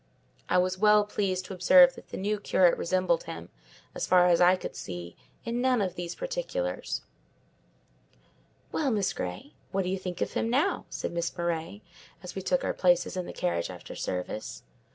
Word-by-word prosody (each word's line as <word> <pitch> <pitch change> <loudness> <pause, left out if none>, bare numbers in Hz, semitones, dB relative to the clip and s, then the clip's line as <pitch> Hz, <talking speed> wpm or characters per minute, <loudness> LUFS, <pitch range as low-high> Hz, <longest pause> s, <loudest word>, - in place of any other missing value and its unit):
I - - +3
was 185 +1 +1
well 210 0 +5
pleased 190 -3 -1
to 190 - -7
observe 265 +9 +7
that - - -13
the - - -7
new 205 +2 -1
curate 185 -3 +4
resembled 185 - 0
him, - - -7 0.4
as - - -3
far 180 -1 +6
as 175 0 +4
I 180 +1 +7
could - - -7
see, 90 -2 -7 0.3
in 235 +1 -1
none 255 -1 +3
of 190 -4 -1
these 175 -1 -5
particulars. - - -3 1.7
"Well, 295 -4 0
Miss 205 -5 0
Grey, 90 +11 -6 0.2
what 195 0 0
do 180 - -2
you 190 0 -1
think 180 -2 -5
of - - -2
him 225 - 0
now?" 270 +6 +1
said - - -4
Miss 170 0 -3
Murray, 170 +4 -3 0.4
as 180 - -7
we 190 - -4
took 180 -1 0
our - - 0
places 175 -1 +2
in 180 -1 -3
the - - -5
carriage 85 -1 -1
after 90 -1 -9
service. 90 +4 -4
185 Hz, 185 wpm, -28 LUFS, 175-210 Hz, 1.7 s, observe